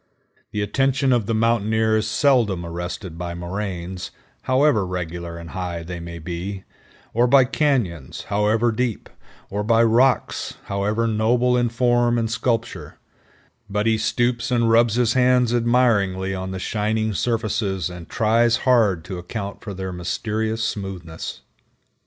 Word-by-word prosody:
The 105 - -1
attention 135 +4 +1
of 115 -4 +1
the 115 - 0
mountaineer 110 -1 +2
is 110 0 -1
seldom 110 -6 +2
arrested 85 +1 -6
by 85 -1 -4
moraines, 90 0 -5 0.4
however 130 -4 +4
regular 85 -2 -5
and 85 -1 -9
high 90 -2 -4
they 90 +1 -6
may 85 0 -7
be, 90 +4 -5 0.5
or 120 +2 +3
by 130 +1 +6
cañons, 120 - -1
however 105 +3 +1
deep, 115 0 -2 0.4
or 105 +1 -1
by 115 +1 +4
rocks, 120 +3 +2
however 105 +3 -1
noble 120 +3 +2
in 120 -1 +2
form 120 0 +2
and 115 -1 -1
sculpture; 115 -2 -2 0.7
but 105 +1 -1
he 110 -1 +2
stoops 120 +2 0
and 115 -2 +2
rubs 115 -1 +4
his 120 -2 +2
hands 125 -2 +3
admiringly 115 -6 +2
on 95 0 -4
the 95 - -4
shining 110 +3 -1
surfaces 110 -5 -1
and 90 -2 -9
trios 115 +2 +3
hard 110 -10 +3
to 90 -1 -5
account 100 +3 -6
for 100 -3 -7
their 95 0 -5
mysterious 110 +5 -2
smoothness. 95 -7 -5
110 Hz, 140 wpm, -22 LUFS, 95-120 Hz, 0.7 s, by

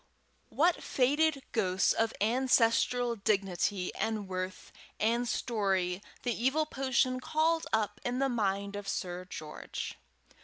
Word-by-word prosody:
What 335 +3 +2
faded 285 +2 +2
ghosts 190 -4 +2
of 225 0 +1
ancestral 245 +1 +3
dignity 195 -2 0
and 215 -3 -2
worth 185 0 -5 0.3
and 235 +3 +1
story 195 -6 0 0.2
the 245 - 0
evil 265 +7 +1
potion 260 -2 +1
called 320 +4 +1
up 210 -1 0
in 245 +1 -1
the 275 +1 +2
mind 200 -4 -1
of 205 -1 -6
Sir 180 -1 -3
George! 155 -4 -6
225 Hz, 120 wpm, -31 LUFS, 195-255 Hz, 0.3 s, ancestral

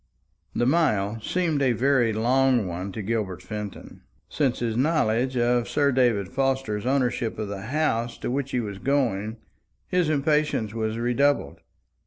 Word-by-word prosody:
The 120 - +1
mile 115 -8 +1
seemed 165 +2 0
a 130 -3 +3
very 125 -1 +2
long 125 +1 +2
one 90 +2 -4
to 110 - -5
Gilbert 95 -4 -2
Fenton. 105 +1 -7 0.3
Since 135 -4 0
his 115 -2 -2
knowledge 130 -3 +1
of 120 0 +1
Sir 140 -1 +2
David 120 -7 +2
Forster's 130 -4 -1
ownership 125 -4 0
of 105 -2 -4
the 100 +1 -6
house 120 -4 0
to - - -4
which 135 +1 -2
he 125 - -1
was 100 -3 -6
going, 115 -6 0 0.5
his 180 -3 +1
impatience 150 -7 +1
was 110 -1 -2
redoubled. 120 - +1
120 Hz, 150 wpm, -25 LUFS, 110-135 Hz, 0.5 s, a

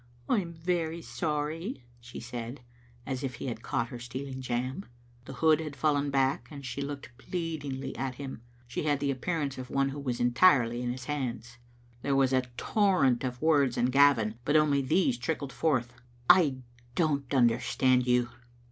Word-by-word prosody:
" 120 0 -29
I 235 - +3
am 170 -3 -5
very 165 0 -2
sorry," 150 - -3 0.2
she 120 +1 -9
said, 120 +2 -6 0.4
as 135 0 -3
if 130 -2 -3
he - - -7
had 120 -3 -4
caught 115 0 -1
her 120 - -7
stealing 130 +2 -6
jam. 130 +7 -3 0.4
The - - -8
hood 160 -1 +4
had 155 -3 -5
fallen 145 -1 +1
back, 135 -3 +1
and 140 -2 -9
she 135 +2 -4
looked 140 -3 -6
pleadingly 145 -5 -4
at 130 -1 -3
him. 135 -3 -7 0.3
She 120 - -3
had 145 -2 +2
the 140 -1 0
ajipearance 140 0 -2
of 125 -1 -7
one 140 0 +1
who 140 +2 -6
was 130 -4 -3
entirely 120 -2 +4
in 125 - -2
his 125 +1 -6
hands. 120 -4 -4 0.4
There 140 +2 0
was 135 -1 +3
a 130 - +4 0.2
torrent 180 - +2
of 125 +1 -4
words 145 -6 +3
in 125 +1 +2
GaviUj 125 -6 +4
but 145 +4 +1
only 150 -2 +4
these 190 - +2
trickled 145 -5 -3
forth 120 -7 0
— 120 0 -30
" 120 - -29
I 155 -8 +6 0.4
don't 145 -6 0
understand 125 0 +3
you." 125 -1 +3
135 Hz, 185 wpm, -29 LUFS, 125-150 Hz, 0.4 s, I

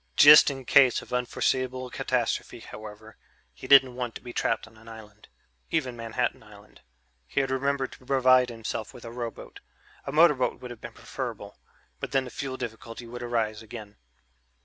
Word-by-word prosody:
Just 150 +1 +9
in 135 -2 -6
case 130 -1 +5
of - - -12
unforeseeable 130 +1 -1
catastrophe, - - -2
however 110 +1 -11 0.4
he - - -10
didn't 135 -2 +7
want 125 -2 -4
to - - -8
be 120 0 -9
trapped - - -1
on 115 0 -19
an 110 +1 -18
island, 105 -2 -13 0.4
even 130 -7 -1
Manhattan 115 +1 -2
Island 105 0 -17 0.5
he - - -1
had 135 -1 0
remembered 135 0 -1
to 130 - -15
provide 130 -2 +4
himself 115 -1 -6
with 120 - -12
a 115 - -7
rowboat; 120 -1 -7 0.5
a - - -2
motorboat 150 -4 +3
would 125 - -8
have 120 - -11
been - - -9
preferable, - - -7 0.4
but - - -6
then 135 -1 +3
the 125 - -9
fuel 135 -2 -5
difficulty 120 -1 -7
would 120 +1 -8
arise 115 -3 -2
again.... 110 -2 -10
125 Hz, 170 wpm, -27 LUFS, 115-130 Hz, 0.5 s, Just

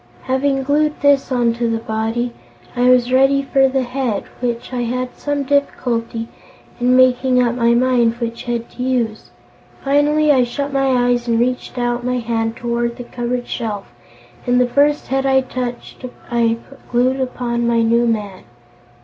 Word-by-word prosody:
Having 270 +1 0
glued 300 +2 +1
this 285 -1 +3
onto 235 -1 +1
the 225 - 0
body, 225 +2 -2 0.4
I 245 +1 +3
was 250 0 +3
ready 270 +1 +4
for 270 0 +3
the 265 0 0
head, 250 -4 -2 0.2
and 240 -2 0
I 250 -1 -2
had 250 +1 -3
some 290 -1 -2
difficulty 235 -5 -1 0.5
in 250 +1 +3
making 255 0 +4
up 240 -1 +2
my 235 -1 +2
mind 240 -2 +2
which 235 -1 -5
head 235 -1 -3
to 250 - -9
use. 245 -4 -1 0.5
Finally 295 +2 +3
I 260 -3 +4
shut 280 +3 -4
my 270 0 +1
eyes 245 -1 +1
and 230 -1 +2
reached 250 +1 -2
out 240 0 -1
my 250 0 -1
hand 225 -1 -2
toward 235 0 -2
the 245 - -6
cupboard 245 0 -3
shelf, 205 - -5 0.5
and 245 0 +3
the 250 - +4
first 290 +4 +1
head 270 0 0
I 265 0 +4
touched 250 -1 -6 0.3
I 230 -1 +2 0.3
glued 255 +2 +1
upon 240 -2 -2
my 230 -1 +2
new 235 +1 +2
man." 210 -4 -3
245 Hz, 165 wpm, -18 LUFS, 235-265 Hz, 0.5 s, ready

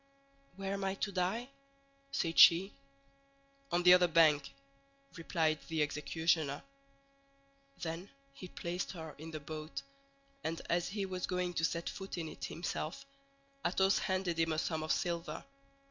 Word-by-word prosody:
"Where 195 0 -3
am 200 0 -3
I 190 0 0
to 200 +1 -2
die?" 195 +7 -1 0.6
said 165 -8 0
she. 185 +4 +8 1.0
"On 175 0 +2
the 180 0 +9
other 180 -1 +6
bank," 155 -4 +4 0.7
replied 160 -2 0
the 160 -2 +1
executioner. 150 0 0 1.2
Then 170 +3 -4 0.2
he 185 - -9
placed 175 +1 -4
her 160 -3 -7
in 160 +1 -7
the 155 -1 -5
boat, 155 +1 -6 0.6
and 165 +1 -2
as 170 0 +2
he 200 0 -2
was 185 -1 -3
going 180 -1 -1
to 165 - -1
set 170 +1 0
foot 195 -1 -5
in 165 -2 -3
it - - -6
himself, 165 -1 -4 0.6
Athos 190 +2 +3
handed 185 -3 -1
him 165 -1 +2
a - - -2
sum 160 0 -1
of 155 - -1
silver. 170 -1 -2
170 Hz, 145 wpm, -34 LUFS, 160-185 Hz, 1.2 s, the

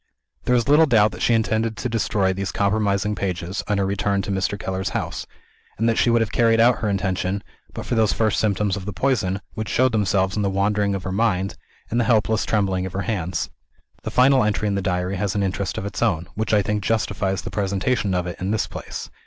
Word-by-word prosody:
There 125 +1 +3
is 120 0 +1
little 150 +3 +6
doubt 110 -5 +4
that 90 0 -9
she 120 - +3
intended 110 0 0
to 125 - -2
destroy 105 -4 0
these 95 -1 -3
compromising 100 0 +1
pages, 90 -1 -3
on 105 -1 +1
her 100 - +1
return 100 0 0
to 100 - -4
Mr. 95 +1 -1
Keller's 95 -1 -3
house - - -4 0.5
and 115 - +1
that 115 - +2
she - - +3
would 115 0 +3
have 110 - -1
carried 115 -1 +3
out 120 +1 +5
her 110 - -1
intention, 95 0 -1 0.3
but - - -7
for - - -3
those 110 -2 +3
first 110 -2 +1
symptoms 100 -2 +1
of 95 - -6
the 105 - -3
poison, 100 -4 0
which 110 -2 -4
showed 130 +3 +3
themselves 100 -3 +1
in 105 - 0
the 100 - +1
wandering 100 +1 +1
of 95 - -5
her 95 - -4
mind, 95 -2 0 0.4
and 120 - +1
the 120 - +2
helpless 110 -2 +2
trembling 95 -3 0
of 95 - -9
her 95 - -2
hands. 85 - -2 0.5
The - - -4
final 130 0 +4
entry 105 0 0
in 100 - 0
the 100 - 0
Diary 90 0 -1
has 100 +1 -1
an 100 - +1
interest 95 0 -2
of - - -3
its 100 - -5
own, 85 0 +1
which 110 0 -2
I 105 -2 +4
think 105 0 -1
justifies 100 -3 -1
the - - -6
presentation 100 +1 0
of 90 -1 0
it 90 - -6
in 95 - -1
this 110 0 +1
place. - - -7
100 Hz, 235 wpm, -22 LUFS, 95-110 Hz, 0.5 s, little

